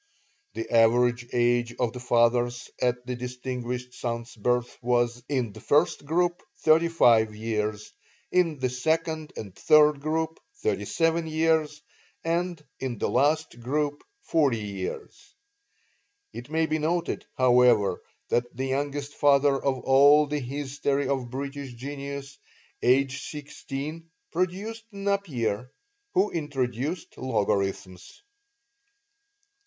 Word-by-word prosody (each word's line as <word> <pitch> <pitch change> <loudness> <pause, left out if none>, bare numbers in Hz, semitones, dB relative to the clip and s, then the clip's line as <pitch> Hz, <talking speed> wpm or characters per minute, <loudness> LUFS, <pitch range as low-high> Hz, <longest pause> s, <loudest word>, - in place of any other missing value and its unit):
The 115 - -4
average 120 +1 +4
age 120 -1 +1
of 120 -2 0
the 125 - -6
fathers 120 0 +1
at 125 0 0
the 125 0 -3
distinguished 125 0 -5
son's 115 -1 -4
birth 125 +2 0
was, 120 0 +1
in 125 -7 -1
the - - -11
first 150 0 +2
group, 175 +3 +1 0.2
35 155 -10 +4
years; 105 -1 -3 0.4
in 170 -4 +2
the 130 -1 0
second 160 +4 -1
and 100 -4 -7
third 150 +4 +5
group, 160 +2 -1 0.2
37 165 - 0
years; 155 -1 +1 0.4
and 170 -1 -1
in 130 -3 -3
the - - -1
last 150 -3 +1
group, 145 +4 -1 0.2
40 145 -7 +2
years. 100 -3 -6 1.0
(It 120 - -8
may 160 +1 +1
be 155 0 -1
noted, 165 +3 -1
however, 125 -6 +4 0.3
that 120 - +2
the 130 - -1
youngest 145 +1 -2
father 140 -1 +4
of 135 -1 -1
all 140 +4 +6
the 150 0 -2
history 140 +1 -2
of 130 -3 -1
British 140 0 -5
genius, 140 +1 -7 0.4
aged 135 +2 +2
sixteen, 150 +2 -7 0.2
produced 195 +6 -2
Napier, 145 - -2 0.4
who 380 +2 +3
introduced 145 0 -3
logarithms.) 100 - -2
135 Hz, 115 wpm, -26 LUFS, 120-155 Hz, 1.0 s, all